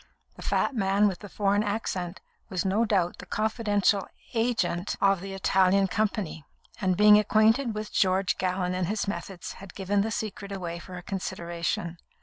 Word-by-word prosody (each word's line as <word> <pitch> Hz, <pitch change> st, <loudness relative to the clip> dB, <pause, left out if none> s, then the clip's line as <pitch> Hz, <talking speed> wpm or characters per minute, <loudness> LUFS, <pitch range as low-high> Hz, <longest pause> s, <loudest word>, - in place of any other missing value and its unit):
The -, -, -12 dB
fat -, -, 0 dB
man 200 Hz, -2 st, +3 dB
with 190 Hz, -3 st, -2 dB
the 205 Hz, -, -10 dB
foreign 200 Hz, 0 st, +1 dB
accent 195 Hz, -4 st, -3 dB, 0.3 s
was 185 Hz, -1 st, -2 dB
no 205 Hz, +5 st, +2 dB
doubt 185 Hz, -5 st, +1 dB
the -, -, -9 dB
confidential 210 Hz, -2 st, +1 dB, 0.3 s
agent 225 Hz, -6 st, 0 dB
of 195 Hz, -2 st, +3 dB
the 195 Hz, 0 st, -6 dB
Italian 190 Hz, +2 st, +3 dB
company, 200 Hz, -5 st, -2 dB, 0.4 s
and 185 Hz, -3 st, +1 dB
being 210 Hz, 0 st, +8 dB
acquainted 220 Hz, +3 st, +3 dB
with 215 Hz, 0 st, -5 dB
George 185 Hz, -1 st, +2 dB
Gallon 185 Hz, -1 st, 0 dB
and 180 Hz, -1 st, -1 dB
his 205 Hz, +1 st, -1 dB
methods, 195 Hz, -3 st, -5 dB
had 195 Hz, -2 st, -11 dB
given 200 Hz, +1 st, +1 dB
the 220 Hz, -, -1 dB
secret 205 Hz, -2 st, -4 dB
away 175 Hz, -3 st, -4 dB
for 180 Hz, +1 st, -9 dB
a 180 Hz, -, -8 dB
consideration. 175 Hz, -2 st, -3 dB
195 Hz, 165 wpm, -27 LUFS, 185-210 Hz, 0.4 s, being